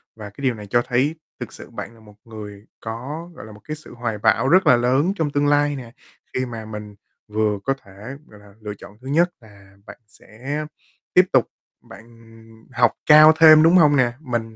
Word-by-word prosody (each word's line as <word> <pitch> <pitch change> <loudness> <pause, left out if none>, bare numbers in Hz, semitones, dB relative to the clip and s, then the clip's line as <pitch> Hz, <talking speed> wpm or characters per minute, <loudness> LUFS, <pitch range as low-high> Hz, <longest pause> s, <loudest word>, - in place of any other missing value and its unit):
và 105 -2 -9
cái 105 - -14
điều 130 -2 +1
này 105 -2 -10
cho 120 +4 +2
thấy 130 +5 0 0.2
thực - - -8
sự - - -12
bạn - - -8
là 115 - -20
một 105 -2 -18
người 105 -3 -11
có, 135 +10 -7
gọi - - -11
là, 110 - -12
một 105 0 -15
cái 155 - -4
sự 155 - -14
hoài 120 -2 -4
bão 115 +4 +1
rất 185 +3 +4
là 130 - +7
lớn 130 +9 +1
trong 160 -6 -2
tương 145 0 0
lai 145 0 +2
nè. 120 -4 -9 0.4
Khi 130 - -1
mà 115 -3 -8
mình 105 -1 -9 0.3
vừa 105 -1 -1
có 135 - 0
thể, 105 +8 -11
gọi 105 - -17
là, 105 -1 -19
lựa 105 -1 -6
chọn 105 - -14
thứ 130 - -12
nhất 165 +6 +2
là 100 -3 -19
bạn - - -12
sẽ 130 +7 -7 0.5
tiếp 180 - +6
tục 130 -4 +3 0.4
bạn 115 - -13 0.7
học 120 0 +3
cao 155 +1 +8
thêm, 155 -1 +8
đúng 165 +2 +5
hông 150 -4 +5
nè? 125 -3 +2
Mình 120 -6 -5
120 Hz, 215 wpm, -21 LUFS, 110-145 Hz, 0.7 s, cao